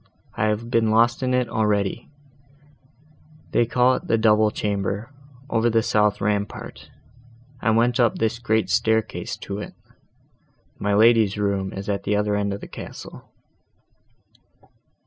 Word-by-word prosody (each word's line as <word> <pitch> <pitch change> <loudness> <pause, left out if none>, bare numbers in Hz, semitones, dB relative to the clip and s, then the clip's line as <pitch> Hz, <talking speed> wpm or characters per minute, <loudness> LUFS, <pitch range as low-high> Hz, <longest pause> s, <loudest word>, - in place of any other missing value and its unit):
I - - -1
have 110 +2 -2
been 115 -2 +2
lost 115 +3 +3
in 130 -1 0
it 125 -1 +1
already: 105 -1 -1 1.4
they 120 - +2
call 125 +1 +3
it - - -4
the 115 - +2
double 110 -1 +4
chamber, 105 +3 -3 0.4
over 120 -3 +1
the 115 -1 +2
south 105 -1 +2
rampart, 105 0 -3 0.7
and 110 -1 +2
I - - +3
went 120 +1 +2
up 120 -3 +3
this 115 +1 -1
great 110 -2 0
staircase 110 0 0
to 100 +1 -5
it. - - -8 1.0
My 100 0 0
lady's 110 -2 +4
room 100 -2 -1
is 95 +1 -7
at 100 -1 -1
the 105 - -1
other 105 0 0
end 100 0 -1
of 100 - -5
the - - -8
castle." - - -10
110 Hz, 145 wpm, -23 LUFS, 105-115 Hz, 1.4 s, double